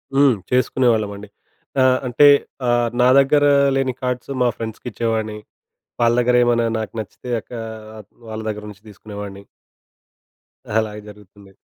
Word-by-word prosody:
హ్మ్. 135 -3 +5 0.2
చేసుకునేవాళ్ళమండి 110 -5 +1 0.5
ఆహ్, 130 0 +4
అంటే 135 +4 +5 0.4
ఆహ్, 120 -1 +2
నా 125 - +5
దగ్గర 145 +2 +3 0.3
లేని 135 -1 0
కార్డ్స్ 125 +1 -3
మా 125 - +4
ఫ్రెండ్స్‌కిచ్చేవాడిని. 110 -1 -3 0.6
వాళ్ళ 120 0 +4
దగ్గర 125 0 +2
ఏమైనా 120 -1 +2
నాకు 110 - -5
నచ్చితే 110 +3 -8
అక్క - - -29 0.4
ఆ! - - -10 0.3
వాళ్ళ 110 0 -6
దగ్గర 105 0 -5
నుంచి 100 +1 -14
తీసుకునేవాడిని. 100 -1 -9 1.4
అలాగే 105 -1 -4
జరుగుతుంది. 100 -1 -16
115 Hz, 125 wpm, -20 LUFS, 105-125 Hz, 1.4 s, హ్మ్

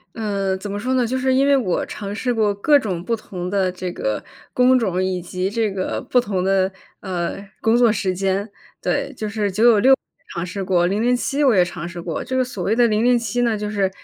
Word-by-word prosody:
呃， 200 -4 -1
怎 205 +2 -7
么 200 - -3
说 255 +5 -1
呢？ 245 -2 +2
就 260 +3 -1
是 260 0 +1
因 270 +2 +3
为 280 - +5
我 210 -10 0
尝 200 -1 -6
试 245 +4 -1
过 215 -3 +1
各 290 +9 +4
种 190 -10 -3
不 230 +4 0
同 180 -4 -6
的 190 -1 +1
这 180 0 -5
个 105 -1 -2 0.3
工 255 +1 +5
种 185 -6 0
以 185 -1 -1
及 180 +2 -3
这 220 0 0
个 190 -1 -3
不 250 - +2
同 200 -6 -1
的， 190 0 +2 0.3
呃， 175 -3 -3 0.3
工 225 +1 +3
作 240 -1 +5
时 195 -3 -1
间。 195 +3 -1 0.3
对， - - -1
就 215 -1 -4
是 210 -1 -1
996 225 +4 +4
也 - - +4 0.4
尝 170 +1 -3
试 195 +2 -5
过， 175 -2 +2
007 245 +8 +1
我 250 - +5
也 180 - +5
尝 170 -1 -6
试 175 0 -7
过， 165 -2 -4
这 260 - -3
个 260 - +3
所 245 -7 -6
谓 210 +5 +1
的 240 0 +4
007 230 +1 +1
呢 230 -3 +1
就 210 0 -4
是， 200 -2 +1
205 Hz, 230 characters per minute, -21 LUFS, 185-240 Hz, 0.4 s, 为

